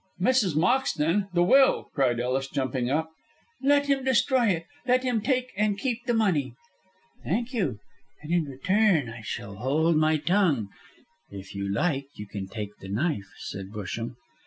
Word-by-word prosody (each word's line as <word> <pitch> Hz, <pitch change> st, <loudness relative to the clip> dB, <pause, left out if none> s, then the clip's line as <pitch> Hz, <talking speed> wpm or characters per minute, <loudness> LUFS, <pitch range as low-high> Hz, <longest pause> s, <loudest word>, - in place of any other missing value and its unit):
"Mrs. 200 Hz, -, +2 dB
Moxton! 190 Hz, -, +2 dB
The 175 Hz, -1 st, +3 dB
will!" 265 Hz, +9 st, +4 dB
cried 125 Hz, -4 st, +1 dB
Ellis, 130 Hz, +2 st, -1 dB
jumping 130 Hz, -2 st, -2 dB
up. 160 Hz, +3 st, 0 dB, 0.5 s
"Let 285 Hz, +1 st, +4 dB
him 275 Hz, -2 st, +1 dB
destroy 260 Hz, -1 st, +3 dB
it! 170 Hz, -4 st, 0 dB, 0.2 s
Let 255 Hz, +1 st, +3 dB
him 245 Hz, -4 st, 0 dB
take 255 Hz, +1 st, 0 dB
and 205 Hz, 0 st, +1 dB
keep 245 Hz, +1 st, -3 dB
the 240 Hz, -, +2 dB
money!" 185 Hz, -11 st, +1 dB, 0.7 s
"Thank 245 Hz, +3 st, -2 dB
you; 175 Hz, -, -1 dB, 0.5 s
and 155 Hz, -, -6 dB
in 170 Hz, -3 st, +2 dB
return 160 Hz, -, +2 dB
I 115 Hz, 0 st, -9 dB, 0.2 s
will 100 Hz, 0 st, -10 dB
hold 155 Hz, +7 st, +2 dB
my 155 Hz, 0 st, +3 dB
tongue. 155 Hz, -, +1 dB, 0.6 s
If 95 Hz, -1 st, -9 dB
you 100 Hz, 0 st, -3 dB
like 140 Hz, -, 0 dB
you 105 Hz, -, -7 dB
can 100 Hz, -1 st, -6 dB
take 105 Hz, 0 st, -6 dB
the 95 Hz, -, -9 dB
knife," 105 Hz, -, -1 dB
said 95 Hz, -1 st, -6 dB
Busham. 110 Hz, +3 st, -5 dB
160 Hz, 160 wpm, -26 LUFS, -, 0.7 s, will